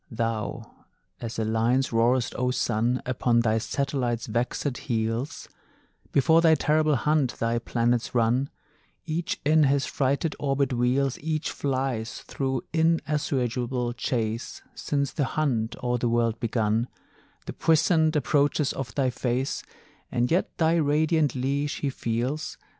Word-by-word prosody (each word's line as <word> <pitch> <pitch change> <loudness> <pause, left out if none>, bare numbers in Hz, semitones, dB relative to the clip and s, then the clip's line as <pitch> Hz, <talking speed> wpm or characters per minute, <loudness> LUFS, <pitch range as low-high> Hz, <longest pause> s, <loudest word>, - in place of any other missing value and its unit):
Thou 115 -2 -2 0.6
as 115 -1 -6
a 110 - 0
lion 115 +4 +2
roar'st, 120 0 +1
O 125 0 0
Sun, 120 0 0
Upon 125 -2 +2
thy 110 -1 +2
satellites' 125 -2 -1
vexèd 125 +4 -2
heels; 115 +4 -2 0.6
Before 160 +4 +4
thy 160 -1 +6
terrible 155 0 +2
hunt 145 0 +1
thy 115 +1 0
planets 120 +1 0
run; 120 +4 +2 0.6
Each 165 +2 -2
in 155 0 +5
his 140 0 +2
frighted 140 +3 0
orbit 135 -2 0
wheels, 125 +2 +1
Each 155 0 -2
flies 130 -4 -2
through 135 -2 -2
inassuageable 130 -7 0
chase, 115 -2 -3
Since 140 -2 -1
the 145 - 0
hunt 120 -7 0
o' 125 0 +1
the 120 0 0
world 115 -1 +1
begun, 115 0 0 0.6
The - - -5
puissant 160 0 +3
approaches 145 0 +2
of 125 -4 -6
thy 130 -3 +1
face, 125 +2 -1 0.5
And 125 0 0
yet 175 - 0
thy 165 0 +3
radiant 155 -1 +2
leash 140 +3 -1
he 140 - 0
feels. 125 +6 -3
130 Hz, 130 wpm, -26 LUFS, 120-145 Hz, 0.6 s, thy